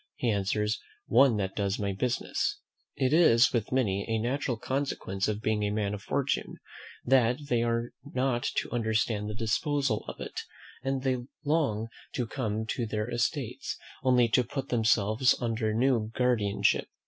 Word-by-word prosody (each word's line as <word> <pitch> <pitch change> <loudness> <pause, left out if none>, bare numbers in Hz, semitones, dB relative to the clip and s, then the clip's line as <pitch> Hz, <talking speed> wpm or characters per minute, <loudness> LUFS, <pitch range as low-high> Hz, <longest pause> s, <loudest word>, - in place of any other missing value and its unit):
he 120 - 0
answers, 105 +3 0 0.3
"one 135 -5 +5
that 95 -2 -2
does 100 -1 0
my 100 -1 -1
business." 120 +5 -1 0.4
It 130 +1 +1
is, 130 -8 +6
with 115 -4 -1
many, 100 -7 +1
a 110 - +1
natural 125 +2 -1
consequence 120 -7 -2
of 105 0 -2
being 110 -1 +1
a 105 - +1
man 105 -1 -1
of 105 - -5
fortune, 140 +5 -1 0.5
that 125 -1 +4
they 120 -1 +2
are 115 0 0
not 130 -3 0
to - - -1
understand 110 -2 0
the 105 - -4
disposal 120 +2 0
of - - -7
it; - - -5 0.4
and 135 0 -1
they 130 -1 +1 0.3
long 140 -8 +1 0.3
to 125 - -1
come 110 -2 -2
to 115 +1 -2
their 105 +2 -2
estates, 120 +1 -2 0.2
only 125 -2 +4
to 125 - +4
put 135 +3 -5
themselves 115 +1 +3
under 115 -2 -1
new 115 -1 +2
guardianship. 115 -5 +2
115 Hz, 160 wpm, -29 LUFS, 105-130 Hz, 0.5 s, is